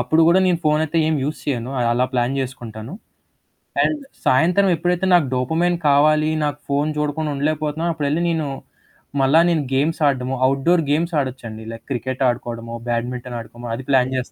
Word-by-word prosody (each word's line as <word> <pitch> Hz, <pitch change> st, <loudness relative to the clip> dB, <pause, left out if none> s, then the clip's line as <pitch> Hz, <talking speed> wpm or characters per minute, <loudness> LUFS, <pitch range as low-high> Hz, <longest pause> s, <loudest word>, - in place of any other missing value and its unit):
అప్పుడు 125 Hz, +7 st, +2 dB
గూడా 175 Hz, +3 st, +5 dB
నేను 180 Hz, -2 st, +2 dB
ఫోనయితే 155 Hz, +1 st, +1 dB
ఏం 160 Hz, -, +1 dB
యూజ్ 150 Hz, +3 st, -3 dB
చేయాను. 125 Hz, -3 st, -2 dB, 0.2 s
అలా 125 Hz, +2 st, +2 dB
ప్లాన్ 125 Hz, +1 st, 0 dB
జేసుకుంటాను. 120 Hz, -3 st, -6 dB, 0.9 s
అండ్ 305 Hz, -2 st, 0 dB, 0.2 s
సాయంత్రం 175 Hz, +9 st, +4 dB
ఎప్పుడైతే 175 Hz, +2 st, 0 dB
నాకు 175 Hz, -4 st, +5 dB
డోపమైన్ 160 Hz, +8 st, +1 dB
కావాలి 155 Hz, +2 st, +4 dB
నాకు 145 Hz, -1 st, -2 dB
ఫోను 145 Hz, +2 st, 0 dB
చూడకుండా 150 Hz, +1 st, -1 dB
ఉండలేకపోతున్నా, 155 Hz, +2 st, -1 dB
అప్పుడెళ్ళి 150 Hz, +1 st, -1 dB
నేను, 160 Hz, -3 st, -1 dB, 0.7 s
మళ్ళా 135 Hz, +4 st, +5 dB
నేను 165 Hz, -3 st, +1 dB
గేమ్స్ 145 Hz, +5 st, +1 dB
ఆడడము. 130 Hz, -1 st, 0 dB
Outdoor 135 Hz, +6 st, +3 dB
games 165 Hz, +4 st, 0 dB
ఆడొచ్చండి. 120 Hz, -5 st, -5 dB
Like 115 Hz, 0 st, -10 dB
cricket 130 Hz, +1 st, -2 dB
ఆడుకోవడమో, 115 Hz, -1 st, -4 dB
badminton 120 Hz, +1 st, -3 dB
ఆడుకోమో 120 Hz, +1 st, -9 dB
అది 130 Hz, +2 st, -8 dB
ప్లాన్ 130 Hz, -1 st, +3 dB
చేస్ 125 Hz, -1 st, -3 dB
140 Hz, 155 wpm, -21 LUFS, 125-160 Hz, 0.9 s, గూడా